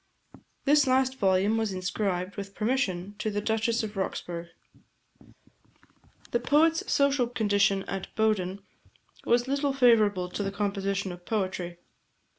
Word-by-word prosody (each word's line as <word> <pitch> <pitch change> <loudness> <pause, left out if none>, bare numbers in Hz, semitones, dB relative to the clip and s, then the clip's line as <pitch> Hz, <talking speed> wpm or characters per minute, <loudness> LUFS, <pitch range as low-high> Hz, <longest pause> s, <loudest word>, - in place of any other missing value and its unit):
This 290 -1 +4
last 260 0 +2
volume 195 +2 +2
was 220 -3 -1
inscribed, 185 0 -2
with 200 -1 -7
permission, 205 -5 -1
to 215 - -1
the 205 0 -2
Duchess 225 +2 0
of 210 -1 -5
Roxburghe. 170 -3 -4 1.8
The 240 - +1
poet's 315 +6 +2
social 280 -3 +3
condition 205 -4 +1
at 195 -1 -5
Bowden 200 -3 0 0.6
was 240 +1 +2
little 280 +1 0
favourable 215 -8 +4
to 180 - -4
the 195 -1 -2
composition 200 -1 -2
of 175 0 -10
poetry. 185 -4 -3
205 Hz, 125 wpm, -28 LUFS, 190-240 Hz, 1.8 s, This